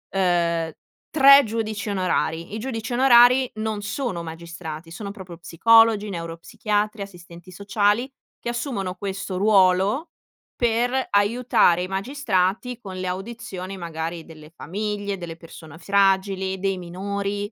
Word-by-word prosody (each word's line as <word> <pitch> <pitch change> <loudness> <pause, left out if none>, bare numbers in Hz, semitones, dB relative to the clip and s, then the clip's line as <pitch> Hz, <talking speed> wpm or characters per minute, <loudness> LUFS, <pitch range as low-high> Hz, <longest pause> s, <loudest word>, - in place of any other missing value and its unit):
uhm, 170 -3 +1 0.4
3 275 -1 +8
giudici 215 -2 -3
onorari. 180 -2 -1
I - - -3
giudici 225 -1 -5
onorari 250 0 +6
non 215 -1 -3
sono 200 -4 -3
magistrati, 165 -1 -8
sono 200 +4 -7
proprio 185 -5 -10
psicologi, 220 +4 +4
neuropsichiatri, 200 +5 -3
assistenti 175 -1 -13
sociali, 205 +6 0 0.3
che - - -5
assumono 235 -7 -3
questo 195 -1 -5
ruolo, 200 - +3 0.5
per 245 +2 0
aiutare 205 -4 +3
i 185 - -4
magistrati 205 +1 -1
con 195 -5 -9
le 185 - -4
audizioni, 195 -1 -6
magari, 165 -1 -5
delle 155 -2 -13
famiglie, 205 +3 -4
delle 170 -2 -7
persone 160 -2 -13
fragili, 190 0 +1
dei 195 0 -1
minori. 200 +3 -4
200 Hz, 120 wpm, -23 LUFS, 175-225 Hz, 0.5 s, 3